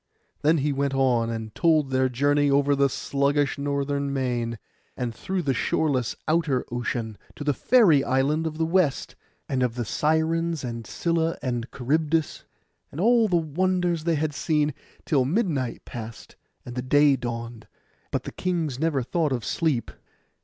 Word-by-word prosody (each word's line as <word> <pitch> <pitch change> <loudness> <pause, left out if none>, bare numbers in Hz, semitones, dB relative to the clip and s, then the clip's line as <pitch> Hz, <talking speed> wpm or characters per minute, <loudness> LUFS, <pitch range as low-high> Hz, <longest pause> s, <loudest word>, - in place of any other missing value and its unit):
Then 155 +3 +4
he 145 0 0
went 140 0 -1
on, 125 -4 +2
and 110 -2 -5
told 155 -5 +2
their 130 0 +2
journey 145 +3 +2
over 140 +1 +3
the 140 0 +3
sluggish 140 +1 0
northern 140 0 -1
main, 120 -4 -1 0.4
and 120 -2 -2
through 185 +9 -3
the 135 - +1
shoreless 130 -4 0
outer 155 -5 +1
ocean, 120 -3 -3 0.2
to - - -6
the 145 0 +1
fairy 170 - +4
island 145 +5 +1
of 155 -1 -5
the 160 - +1
west; 165 -4 +1 0.3
and 130 -2 -1
of 125 -2 0
the 120 -2 -2
Sirens, 160 +4 0
and 115 -2 -5
Scylla, 165 -1 0
and 120 -3 -2
Charybdis, 155 +4 -1 0.5
and 145 - -8
all 230 +3 +4
the 185 - +1
wonders 175 +1 0
they 170 -1 +2
had 150 0 -1
seen, 150 -1 0 0.3
till 140 -4 +2
midnight 145 - -1
passed 115 -1 -9 0.3
and 120 - -7
the 125 - -3
day 145 +2 +4
dawned; 115 -2 -6 0.4
but - - -2
the - - -6
kings 165 -8 -2
never 155 -4 +1
thought 160 +3 0
of 120 -4 -2
sleep. 155 -8 0
140 Hz, 160 wpm, -25 LUFS, 125-160 Hz, 0.5 s, Then